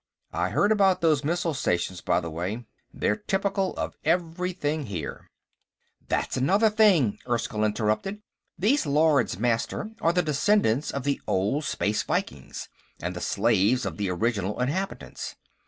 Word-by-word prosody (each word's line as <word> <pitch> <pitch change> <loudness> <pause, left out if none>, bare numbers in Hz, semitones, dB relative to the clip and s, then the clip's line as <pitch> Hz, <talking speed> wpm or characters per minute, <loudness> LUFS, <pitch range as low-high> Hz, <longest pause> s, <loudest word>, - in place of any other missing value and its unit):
I 90 +2 0
heard 200 - +2
about 195 -3 +4
those 155 -4 +3
missile 170 +1 0
stations, 90 -7 -1
by - - +2
the 85 -1 -5
way. 95 +9 -4 0.3
They're - - 0
typical 195 -2 -1
of - - -4
everything 165 -3 -1
here." 90 -8 -6 0.8
"That's - - -1
another 200 - +3
thing," 190 - +4
Erskyll 115 -2 0
interrupted. 110 - 0 0.3
"These 210 - +2
Lords 145 - +3
Master 120 - -1
are 165 - +4
the 180 0 +1
descendants 150 - +2
of 140 - -3
the 140 0 -1
old 105 +11 0
Space 105 +1 0
Vikings, 65 0 -3 0.3
and 90 +2 -4
the 90 - -5
slaves 115 +3 +2
of - - -4
the 100 -2 -1
original 100 +1 -1
inhabitants. 160 +10 -3
140 Hz, 140 wpm, -26 LUFS, -, 0.8 s, about